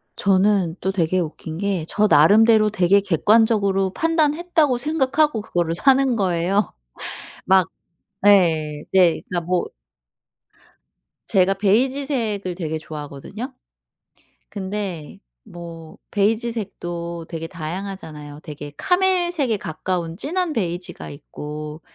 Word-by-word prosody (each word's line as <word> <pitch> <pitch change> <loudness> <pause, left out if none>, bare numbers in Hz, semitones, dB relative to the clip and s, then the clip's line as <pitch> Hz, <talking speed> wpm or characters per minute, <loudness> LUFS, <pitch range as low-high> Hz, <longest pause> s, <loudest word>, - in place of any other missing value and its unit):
저는 195 -3 +2
또 190 - -1
되게 185 -1 +1
웃긴 160 -1 -5
게 195 -4 -1
저 210 +4 +2
나름대로 215 +7 +6
되게 195 -1 +3
객관적으로 200 0 +2
판단했다고 320 -3 +2
생각하고 295 -2 +1
그거를 175 -5 -1
사는 265 +6 +3
거예요. 190 0 0 0.7
막 190 -2 +4 0.6
예. 160 -7 +4
네 180 -3 +4
그러니까 175 -1 0
뭐 180 0 0 1.6
제가 190 0 +3
베이지색을 220 -2 0
되게 160 -3 -3
좋아하거든요. 155 - -8 1.0
근데 190 -5 -5 0.3
뭐 165 -2 -10
베이지색도 200 -6 -2
되게 165 -1 -5
다양하잖아요. 160 -3 -7
되게 145 -1 -8
카멜색에 350 - +1
가까운 170 -1 -4
진한 340 - -2
베이지가 175 - -4
있고 150 - -8
190 Hz, 255 characters per minute, -22 LUFS, 165-225 Hz, 1.6 s, 나름대로